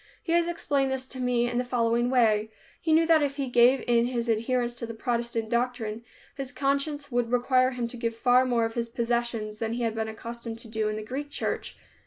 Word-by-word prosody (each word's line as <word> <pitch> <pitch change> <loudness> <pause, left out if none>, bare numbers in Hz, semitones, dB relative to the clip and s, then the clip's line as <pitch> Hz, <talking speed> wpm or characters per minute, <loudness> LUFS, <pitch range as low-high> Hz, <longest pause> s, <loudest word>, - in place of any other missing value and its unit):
He 330 - -3
has 340 0 +3
explained 285 -5 0
this 265 0 -1
to 260 - -8
me 245 -1 +1
in 240 0 -1
the - - +1
following 240 -1 +1
way: 220 -4 +3 0.3
He 320 - 0
knew 325 +1 +5
that 325 -1 +5
if 280 -1 0
he 280 -2 -2
gave 245 +2 +4
in 235 -1 +3
his 240 -1 -2
adherence 240 +2 0
to 240 -1 -6
the 230 - -7
Protestant 235 -1 -2
doctrine, 235 -2 -1 0.3
his 275 -2 -5
conscience 285 +1 -1
would 240 -1 0
require 255 +1 +3
him 250 -2 -3
to 245 - -8
give 230 -1 -2
far 245 +2 +4
more 240 -3 +1
of 225 - -4
his 235 0 -2
possessions 235 -2 -1
than 225 0 -2
he 240 0 -2
had 225 -1 0
been 220 0 -2
accustomed 230 +1 -6
to 230 - -9
do 220 -1 -1
in 215 - -2
the 215 - -5
Greek 270 +6 -5
church. - - -3
240 Hz, 230 wpm, -27 LUFS, 230-260 Hz, 0.3 s, knew